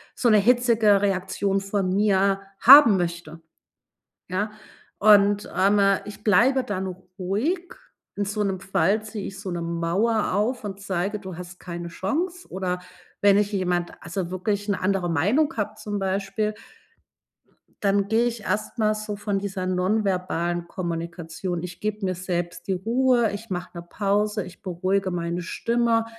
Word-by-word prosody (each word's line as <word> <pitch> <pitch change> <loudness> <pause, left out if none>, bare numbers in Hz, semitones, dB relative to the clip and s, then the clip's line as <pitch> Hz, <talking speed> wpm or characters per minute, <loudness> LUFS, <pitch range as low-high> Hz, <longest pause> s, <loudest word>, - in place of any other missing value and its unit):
so 245 - +2
'ne 215 - +6
hitzige 225 -2 +4
Reaktion 195 0 0
von 195 -1 -1
mir 195 -1 +2 0.2
haben 265 -6 +9
möchte, 170 -2 -4 0.9
ja? 205 +4 -1 0.5
Und, 205 0 +5
ähm, 195 +3 +3 0.3
ich 205 0 -10
bleibe 255 +6 +4
dann 190 -3 -3 0.3
ruhig. 280 - -1 0.4
In 205 - -1
so 205 +1 -1
'nem 195 -2 -1
Fall 195 +2 +1
ziehe 215 -2 -6
ich 195 0 -9
so 195 -2 -5
'ne 175 -1 -3
Mauer 170 +7 0
auf 230 +5 0
und 200 -1 -6
zeige: 195 +1 -2
„Du 185 -3 -8
hast 180 0 -9
keine 170 -1 -6
Chance.“ 340 - -3
Oder 180 -1 -2 0.4
wenn 200 -1 +6
ich 205 0 +1
jemand 180 -3 -1
also 175 +1 -4
wirklich 200 +2 -2
'ne 200 -2 -1
andere 185 -2 0
Meinung 210 - +2
habe 215 0 -2
zum 205 -1 -4
Beispiel 195 +2 -1 1.3
dann 200 0 +2
gehe 225 +2 +3
ich 235 -2 -2
erst 215 +3 -2
mal 215 -1 +2
so 215 -1 -5
von 205 -1 -2
dieser 195 -2 -4
nonverbalen 180 -2 0
Kommunikation. 170 0 -4
Ich 180 -1 -7
gebe 215 0 -3
mir 185 -1 -1
selbst 175 -1 -4
die 195 - +1
Ruhe, 235 +4 +2
ich 205 +3 -7
mache 180 -1 -5
'ne - - -5
Pause, 205 +3 0
ich 180 0 -13
beruhige 185 +1 -1
meine 170 0 -2
Stimme, 230 +5 0
195 Hz, 155 wpm, -24 LUFS, 180-215 Hz, 1.3 s, haben